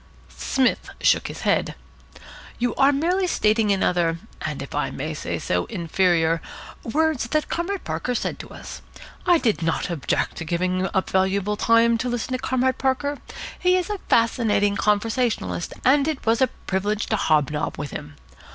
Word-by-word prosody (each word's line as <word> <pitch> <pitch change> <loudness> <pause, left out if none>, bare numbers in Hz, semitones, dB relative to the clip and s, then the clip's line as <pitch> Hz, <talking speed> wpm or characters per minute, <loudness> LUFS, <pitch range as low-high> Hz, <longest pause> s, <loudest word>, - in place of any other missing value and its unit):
Psmith 265 -1 0
shook - - +3
his - - -7
head. - - +1 0.8
"You 245 -1 0
are 275 +1 +4
merely 355 +7 +1
stating 215 -8 +2
in 195 -1 +2
other 170 -2 +1 0.2
and, - - -3
if - - -10
I - - 0
may - - -4
say - - -3
so, - - -1
inferior 170 -3 +1 0.4
words 300 -1 0
what 305 -1 0
Comrade 365 +3 -2
Parker 165 +10 -2
said - - -2
to - - -9
us. - - -9 0.5
I 350 -1 +6
did 220 - 0
not 165 +2 -1
object 160 -5 -1
to - - -4
giving 185 +3 -1
up 190 - -1
valuable 190 +2 +1
time 230 +1 +3
to 250 - -1
listen 240 +1 -3
to 255 - -1
Comrade 260 0 0
Parker. 275 +2 0 0.4
He 365 0 +3
is 365 +3 -2
a 410 - -3
fascinating 220 -3 +2
conversationalist, 210 - 0
and 280 +2 +4
it 310 -3 -3
was 230 +3 +2
a 260 - +5
privilege 205 0 -2
to 220 - 0
hob 155 -7 +2
nob 150 0 -3
with 145 0 -5
him. 145 -1 -8
225 Hz, 170 wpm, -23 LUFS, 185-265 Hz, 0.8 s, I